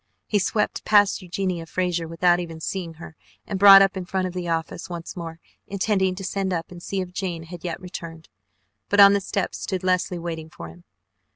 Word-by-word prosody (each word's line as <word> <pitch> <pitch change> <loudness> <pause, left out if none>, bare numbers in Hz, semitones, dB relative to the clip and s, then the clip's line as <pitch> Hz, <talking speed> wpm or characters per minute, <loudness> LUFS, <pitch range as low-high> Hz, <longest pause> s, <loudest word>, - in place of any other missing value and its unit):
He 210 - +1
swept 210 +2 -1
past 205 -2 +4
Eugenia 180 -2 -3
Frazer 175 -1 -1
without 175 +2 +2
even 165 -2 -6
seeing 170 0 -4
her 160 0 -11 0.3
and 195 - -4
brought 195 0 +10
up 195 0 0
in 190 - -4
front 185 +1 -2
of 180 - -4
the 180 -1 -4
office 165 +1 -3
once 170 -1 -7
more, 165 -2 -7 0.3
intending 190 -1 0
to 195 - -7
send 195 0 -2
up 165 -1 -3
and 175 -1 -10
see 195 +2 -3
if 180 -1 -6
Jane 175 -4 -4
had 170 +1 -10
yet 175 -2 -4
returned, 165 -3 -9 0.6
but 205 - +2
on 200 0 +9
the 200 - +1
steps 195 0 -3
stood 185 -1 -3
Leslie 185 -1 0
waiting 165 -2 -6
for 85 - -10
him. 85 +1 -16
180 Hz, 205 wpm, -24 LUFS, 165-190 Hz, 0.6 s, brought